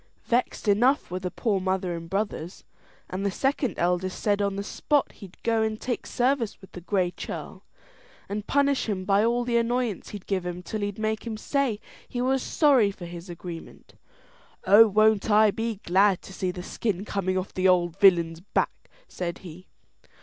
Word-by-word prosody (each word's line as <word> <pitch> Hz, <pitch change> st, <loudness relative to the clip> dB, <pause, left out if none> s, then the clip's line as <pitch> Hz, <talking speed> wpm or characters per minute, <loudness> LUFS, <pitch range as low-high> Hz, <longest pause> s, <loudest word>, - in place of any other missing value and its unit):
Vexed 240 Hz, -1 st, 0 dB
enough 240 Hz, -, +3 dB
were 185 Hz, -, -2 dB
the 185 Hz, 0 st, -3 dB
poor 205 Hz, +1 st, 0 dB
mother 185 Hz, -1 st, -1 dB
and 165 Hz, 0 st, -8 dB
brothers; 195 Hz, -3 st, -3 dB, 0.4 s
and 185 Hz, +2 st, -4 dB
the 200 Hz, -, +1 dB
second 270 Hz, +4 st, -1 dB
eldest 180 Hz, +1 st, 0 dB
said 205 Hz, -1 st, +1 dB
on 200 Hz, -1 st, 0 dB
the 200 Hz, -, -3 dB
spot 290 Hz, +7 st, 0 dB
he'd 190 Hz, -3 st, -13 dB
go 225 Hz, -1 st, +2 dB
and 220 Hz, 0 st, -1 dB
take 245 Hz, -1 st, -3 dB
service 250 Hz, -3 st, 0 dB
with 190 Hz, -, -16 dB
the 180 Hz, -, -9 dB
Gray 185 Hz, 0 st, 0 dB
Churl, -, -, -7 dB, 0.6 s
and 205 Hz, +1 st, -4 dB
punish 280 Hz, -4 st, +2 dB
him 185 Hz, -3 st, -2 dB
by 200 Hz, +1 st, +3 dB
all 240 Hz, +2 st, +2 dB
the 240 Hz, -1 st, +1 dB
annoyance 235 Hz, -3 st, -1 dB
he'd 205 Hz, -3 st, -8 dB
give 190 Hz, -3 st, -1 dB
him 180 Hz, 0 st, -5 dB
till 215 Hz, +2 st, -4 dB
he'd 205 Hz, -1 st, -3 dB
make 220 Hz, +1 st, -2 dB
him 220 Hz, -2 st, -4 dB
say 265 Hz, -3 st, 0 dB, 0.3 s
he 245 Hz, -, -4 dB
was 260 Hz, +1 st, +1 dB
sorry 270 Hz, -10 st, +4 dB
for 195 Hz, -3 st, -8 dB
his 170 Hz, +1 st, -9 dB
agreement. 175 Hz, -1 st, -9 dB, 0.7 s
"Oh, 205 Hz, +4 st, +8 dB
won't 215 Hz, 0 st, +3 dB
I 210 Hz, 0 st, +5 dB
be 225 Hz, +2 st, -2 dB
glad 190 Hz, +1 st, +3 dB
to 190 Hz, -, -11 dB
see 185 Hz, -1 st, -2 dB
the 180 Hz, 0 st, -5 dB
skin 200 Hz, -1 st, -2 dB
coming 190 Hz, -3 st, -1 dB
off 185 Hz, +1 st, -4 dB
the 185 Hz, 0 st, +2 dB
old 175 Hz, -2 st, +3 dB
villain's 170 Hz, -4 st, +5 dB
back!" 185 Hz, -, -2 dB, 0.2 s
said 170 Hz, -2 st, -4 dB
he. 175 Hz, +2 st, -11 dB
200 Hz, 185 wpm, -26 LUFS, 185-225 Hz, 0.7 s, Oh